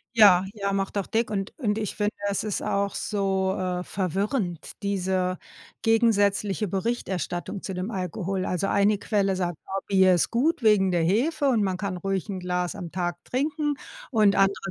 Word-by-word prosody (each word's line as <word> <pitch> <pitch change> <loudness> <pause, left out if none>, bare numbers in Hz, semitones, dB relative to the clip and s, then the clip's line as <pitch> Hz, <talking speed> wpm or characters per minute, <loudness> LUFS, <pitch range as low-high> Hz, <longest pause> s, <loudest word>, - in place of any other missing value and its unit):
Ja, 195 -5 +7
ja, 200 -2 -2
macht 195 +1 -1
auch 195 - -2
dick 225 +1 0
und 195 -2 -3
und 220 -7 -1
ich 215 -2 -3
finde, 210 0 0 0.2
es 200 - -1
ist 215 -3 -2
auch 200 0 -1
so, 190 -2 0
äh, 180 -1 -2
verwirrend, 190 - -2
diese 185 -2 0 0.4
gegensätzliche 210 -2 +2
Berichterstattung 195 -2 -3
zu 190 - -5
dem 185 +5 -4
Alkohol. 185 0 -2
Also 180 +1 -1
eine 200 +1 +3
Quelle 200 -2 0
sagt: 175 -2 -2
„Oh, 195 0 -2
Bier 190 -2 +5
ist 175 - +1
gut 265 +3 +1
wegen 205 -3 +5
der 175 -2 +1
Hefe 275 - +2
und 235 -5 +3
man 190 -2 0
kann 185 -1 -3
ruhig 195 +2 -2
'n 190 -2 -4
Glas 180 -1 -2
am 180 -5 -7
Tag 175 -1 -3
trinken“, 295 +3 -1 0.4
und 210 -4 +4
andere 195 0 +1
195 Hz, 175 wpm, -26 LUFS, 185-210 Hz, 0.4 s, Ja